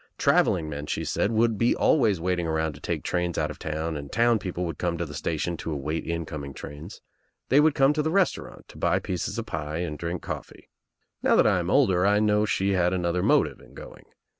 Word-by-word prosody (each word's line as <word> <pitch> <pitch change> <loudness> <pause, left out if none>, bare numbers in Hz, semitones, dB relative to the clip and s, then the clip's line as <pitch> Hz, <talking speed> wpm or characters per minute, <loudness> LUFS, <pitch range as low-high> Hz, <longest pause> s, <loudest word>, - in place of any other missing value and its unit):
Travelling 80 -3 +2
men, 75 -1 -6
she - - -2
said, 105 - 0
would 115 -1 +2
be 115 - +3
always 110 - +3
iwalting 90 0 -1
around 80 -1 -1
to 65 - -13
take - - -3
trains. 90 -1 -1
out_of_ 75 -1 -2
town 80 +1 -3
and 70 -1 -7
town 115 0 +3
Fpcople 90 -2 -4
would 80 -3 -5
come 85 -1 -1
to 85 - -2
the 75 - -9
station 80 +4 -2
to 80 - -5
await 75 +2 -3
incoming 75 -4 -4
trains. 75 +7 -9 0.5
They 135 - +5
would 150 0 +4
come 140 0 +4
to 150 - 0
the 155 - 0
restaurant 185 +1 -1
to - - -13
buy 85 +1 +2
pieces 95 -3 -3
of - - -3
pie 75 +1 -4
and 85 -4 -4
drink 85 +1 -4
coffee. - - -8 0.5
Now - - +3
that - - +5
I - - +3
am - - -3
older 90 -1 +3
I 100 +1 +4
know 105 -1 +3
that 105 - +1
she 100 -1 +1
had 90 -1 +2
another 90 -1 0
motive - - +2
in - - -18
going. - - -11
90 Hz, 225 wpm, -26 LUFS, 80-105 Hz, 0.5 s, They